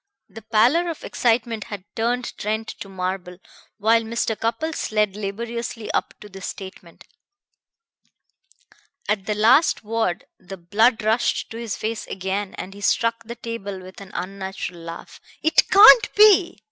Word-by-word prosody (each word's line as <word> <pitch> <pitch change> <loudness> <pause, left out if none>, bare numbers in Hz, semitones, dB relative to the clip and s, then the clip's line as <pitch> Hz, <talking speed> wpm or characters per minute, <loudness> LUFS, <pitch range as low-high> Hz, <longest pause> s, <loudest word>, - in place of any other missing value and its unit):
The 225 - -12
pallor 235 +11 +2
of 325 - -6
excitement 230 -2 0
had 205 -3 -7
turned 240 +2 -1
Trent 220 +2 -3
to 195 - -8
marble 185 -1 -4 0.4
while 225 +2 +3
Mr. 225 0 -2
Cupples 290 +9 -3
led 210 -2 +1
laboriously 225 +2 -5
up - - -2
to 210 - -10
this 195 -2 -8
statement. 190 -3 -10 2.0
At 205 -2 -1
the 210 - 0
last 235 +10 +4
word 220 -5 -2
the 190 +1 -10
blood 220 +7 +2
rushed 220 +3 0
to 225 - -7
his 230 -3 -4
face 220 +1 -4
again 190 +1 -4
and 190 - -7
he 205 - -12
struck 230 +2 +1
the 235 +1 -7
table 220 -5 -6
with 185 +1 -12
an 195 - -11
unnatural 190 -2 -5
laugh. 165 0 -10 0.2
"It 315 +1 +3
can't 435 +3 +8
be!" 410 -4 +5
220 Hz, 145 wpm, -22 LUFS, 195-235 Hz, 2.0 s, can't